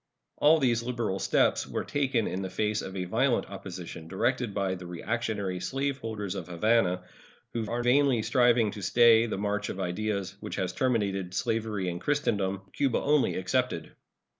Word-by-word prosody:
All 155 +2 +6
these 120 -6 +2
liberal 115 -5 -2
steps - - +2
were - - -3
taken 135 -6 0
in 95 - -3
the 95 - -4
face 105 +1 -1
of 95 - -7
a 90 - -1
violent 120 +7 +1
opposition 90 -4 -8
directed 120 +6 0
by 100 -2 -1
the 90 -1 -7
reactionary 100 0 -2
slave 135 +6 -2
holders 105 -4 -4
of - - -6
Havana, 90 0 +2 0.5
who 110 -3 -2
are 120 +1 -1
vainly 125 -2 +3
striving 120 -4 +3
to 105 - -8
stay 115 +1 +5
the 110 - -3
march 105 +1 -1
of 95 - -5
ideas 100 +1 -2
which - - -6
has 95 -1 -2
terminated 100 -9 0
slavery 110 -3 -1
in 85 -1 -3
Christendom, 100 - 0
Cuba 135 -4 +1
only 150 -1 +2
excepted. 95 -2 -1
110 Hz, 165 wpm, -28 LUFS, 95-120 Hz, 0.5 s, All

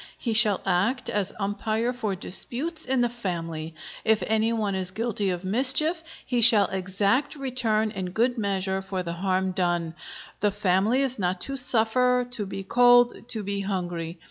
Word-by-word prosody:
He 230 - -2
shall 215 -3 +4
act 195 +8 0
as 205 -2 -1
umpire 215 +4 -1
for 220 -6 -3
disputes 295 - -2
in 260 -1 +1
the 240 - +3
family. 165 -8 -5 0.3
If 220 -1 +2
any 220 +1 +1
one 215 -3 -1
is 190 -1 -2
guilty 210 0 -2
of 180 0 -4
mischief, 270 - +2 0.2
he 245 -2 0
shall 220 -4 +8
exact 195 +9 0
return 240 -6 -1
in 190 -4 -5
good 235 +6 0
measure 195 -3 -2
for 190 -1 -4
the 170 -1 -4
harm 185 +1 -1
done. 175 -3 -1 0.5
The 205 - +2
family 205 +5 +1
is 260 -3 0
not 180 -1 -1
to 275 - -3
suffer, 250 0 +2
to 210 -5 -3
be 195 0 -6
cold, 245 +2 +3
to 220 -3 -2
be 200 0 -3
hungry. 175 -4 -4
210 Hz, 170 wpm, -25 LUFS, 190-245 Hz, 0.5 s, shall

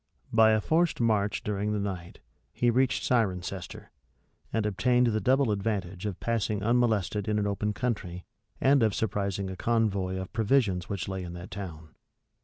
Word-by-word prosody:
By 110 -1 +6
a 110 - +2
forced 165 +7 +1
march 105 -3 +1
during 105 0 -1
the 105 - -1
night, 95 -4 -5 0.3
he 120 0 +2
reached 130 +2 +1
Cirencester, 95 -6 -2 0.6
and 110 -2 0
obtained 125 +5 +2
the 110 -2 +1
double 130 -2 +3
advantage 100 -2 -2
of 95 -3 -5
passing 110 -3 -1
unmolested 110 -4 +1
an 105 -1 +1
open 100 +1 -1
country, 100 -7 -3 0.3
and 135 0 +4
of 110 -3 +2
surprising 100 -2 -2
a - - -6
convoy 100 -4 0
of 95 0 -6
provisions 110 -5 +1
which 100 -3 -3
lay 95 -1 -3
in 85 -1 -7
that 90 +1 -9
town. 85 -5 -8
105 Hz, 160 wpm, -28 LUFS, 95-115 Hz, 0.6 s, By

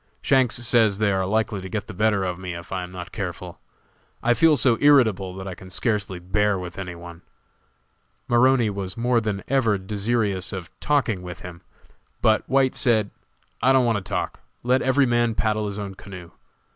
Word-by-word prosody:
Shanks 130 -5 +2
says 115 -4 +3
they 105 -1 +2
are 95 -1 0
likely 110 -1 0
to 95 - -8
get 105 +1 -3
the - - -9
better 105 0 +1
of 90 -1 -3
me 90 -2 -5
if 85 0 -10
I 95 -1 -2
am 90 0 -8
not 90 0 -8
careful. 90 -3 -6 0.6
I 120 - +4
feel 155 +2 +4
so 120 -2 +3
irritable 110 -11 +4
that 95 0 -7
I 95 - -4
can 95 +1 -12
scarcely 100 -1 -2
bear 100 +3 0
with 90 0 -7
any 90 -2 -6
one." 85 0 -11 1.1
Maroney 120 -2 +3
was 100 -1 -5
more 120 0 +2
than 105 -3 -3
ever 120 -6 +2
desirous 100 0 -1
of 90 -3 -7
talking 125 -10 0
with 90 0 -8
him, 90 -1 -10 0.6
but 110 0 +3
White 135 -1 +3
said: 110 -5 +2 0.5
"I 130 - +4
don't 130 -2 +4
want 115 -2 +2
to - - -4
talk; - - -3 0.2
let 125 +1 +2
every 135 +2 +3
man 120 -2 +1
paddle 110 -1 0
his 100 0 -5
own 100 -2 -5
canoe. 95 -3 -11
105 Hz, 190 wpm, -23 LUFS, 95-120 Hz, 1.1 s, I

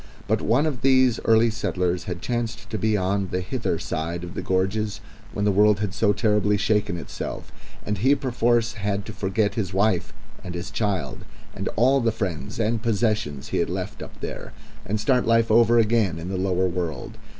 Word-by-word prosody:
But - - +1
one 125 +8 +2
of 140 -6 -2
these 130 -3 +4
early 115 +1 +4
settlers 90 -4 -1
had 90 -1 -5
chanced 115 -1 -3
to 110 - -2
be 110 +1 +2
on 95 +1 0
the 90 - -2
hither 90 - -2
side 85 +2 -3
of 90 +1 -7
the - - -4
gorges 100 +3 -1 0.3
when 105 - -2
the 105 - +4
world 105 +1 +4
had 105 -3 -2
so 105 0 +2
terribly 105 0 +2
shaken 105 -2 +1
itself, - - -6 0.3
and 105 -1 -2
he 135 +7 +4
perforce 120 -3 +1
had 100 -1 -2
to - - -7
forget 100 +2 0
his 100 -5 -3
wife 95 -3 +1 0.3
and 90 -1 -6
his 90 +4 -5
child 100 - -2 0.3
and - - -4
all 130 +3 +4
the 115 -1 +2
friends 95 -7 -4
and 115 0 0
possessions 105 - -1
he - - -1
had - - 0
left - - -4
up - - -10
there, - - -6 0.3
and 105 +2 -1
start 125 +1 +2
life 115 -1 +3
over 115 +1 +5
again 110 -6 +2
in 85 +2 -6
the 95 - -3
lower 95 0 +1
world. 85 -6 -4
105 Hz, 195 wpm, -24 LUFS, 95-115 Hz, 0.3 s, over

